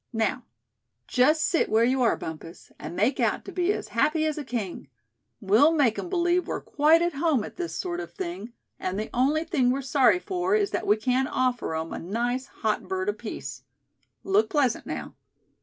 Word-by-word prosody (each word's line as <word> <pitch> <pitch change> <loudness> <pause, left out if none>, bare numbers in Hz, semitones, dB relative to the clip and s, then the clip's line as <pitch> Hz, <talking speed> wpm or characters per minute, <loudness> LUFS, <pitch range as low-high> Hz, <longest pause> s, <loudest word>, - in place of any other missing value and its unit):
Now, 225 +3 -1 0.6
just 300 +5 +3
sit 335 - +1
where 220 +1 +3
you 255 +2 +2
are, 235 - +3
Bumpus, 160 +1 -9
and - - -7
make 225 +9 +1
out - - 0
to - - -7
be 360 +1 +1
as - - -4
happy 310 +1 +1
as 310 -1 0
a - - -4
king. 225 - -5 0.5
We'll 220 +11 +4
make 270 -8 +2
'em 355 - -5
believe 350 0 +1
we're - - -2
quite 315 +3 +3
at 345 -1 0
home 285 -5 +1
at - - -9
this 350 -1 -4
sort 350 -1 -3
of 375 - -7
thing; 345 - -6 0.3
and 185 +1 -3
the 215 - -4
only 285 +6 +2
thing 280 -8 +1
we're 270 +2 0
sorry 270 +4 +4
for 365 +1 -1
is 410 -2 +1
that - - -2
we 210 - +4
can't 255 +4 0
offer 250 -9 0
'em 160 +1 -4
a - - -4
nice 240 +8 -2
hot 215 -2 -2
bird 380 +1 -1
apiece. 415 - -6 0.6
Look 395 +3 +2
pleasant, 285 - +1
now." - - -5
270 Hz, 195 wpm, -26 LUFS, 230-345 Hz, 0.6 s, We'll